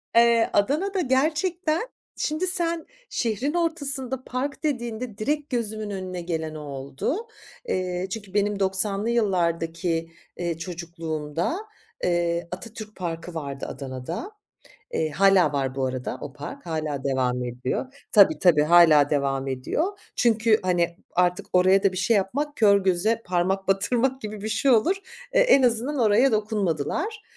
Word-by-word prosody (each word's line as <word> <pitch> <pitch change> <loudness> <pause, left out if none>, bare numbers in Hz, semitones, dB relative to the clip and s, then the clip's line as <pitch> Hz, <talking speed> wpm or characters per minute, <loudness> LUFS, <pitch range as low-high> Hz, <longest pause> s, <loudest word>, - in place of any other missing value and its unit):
Eee, 235 -1 +5
Adana'da 335 - +1
gerçekten 315 - +1 0.3
şimdi 310 +5 -1
sen 340 -2 -1 0.2
şehrin 245 +6 -1
ortasında 280 -6 -2
park 270 +5 -4
dediğinde 240 -6 -3
direkt 295 +6 -1
gözümün 215 -4 -2
önüne 185 -2 -5
gelen 160 -2 -3
o - - -6
oldu. 140 - -4 0.4
Eee, 180 - -1
çünkü 205 -3 -6
benim 205 0 +1
doksanlı 195 +2 0
yıllardaki, 170 -6 0 0.3
eee, 170 -2 -2
çocukluğumda, 165 - -4 0.5
eee, 170 -1 0
Atatürk 215 +3 -8
Parkı 170 -1 -5
vardı 140 -4 -5
Adana'da. 135 - -6 0.6
Eee, 155 -1 0
hâlâ 195 +2 +4
var 135 -2 -1
bu 135 -1 0
arada 130 -1 -4
o 140 - -7
park. 145 +4 -9
Hâlâ 155 -4 -3
devam 125 -2 0
ediyor. 125 - -3 0.2
Tabii, 200 -3 +6
tabii 165 -5 +5
hâlâ 155 -3 +6
devam 135 -2 0
ediyor. 310 - -2 0.2
Çünkü, 225 -2 +3
hani, 175 -2 +1 0.2
artık 180 0 +1
oraya 185 +2 +5
da 195 - +3
bir - - -7
şey 210 +4 +2
yapmak 285 +10 -1
kör 200 -3 +5
göze 200 +5 +1
parmak 185 +2 0
batırmak 245 +7 +1
gibi 215 -3 -6
bir 215 - -3
şey 225 +5 +2
olur. 255 - +4 0.4
E - - +4
en - - +6
azından 250 +4 +1
oraya 230 +3 +4
dokunmadılar. 210 - -1
195 Hz, 140 wpm, -25 LUFS, 165-250 Hz, 0.6 s, Tabii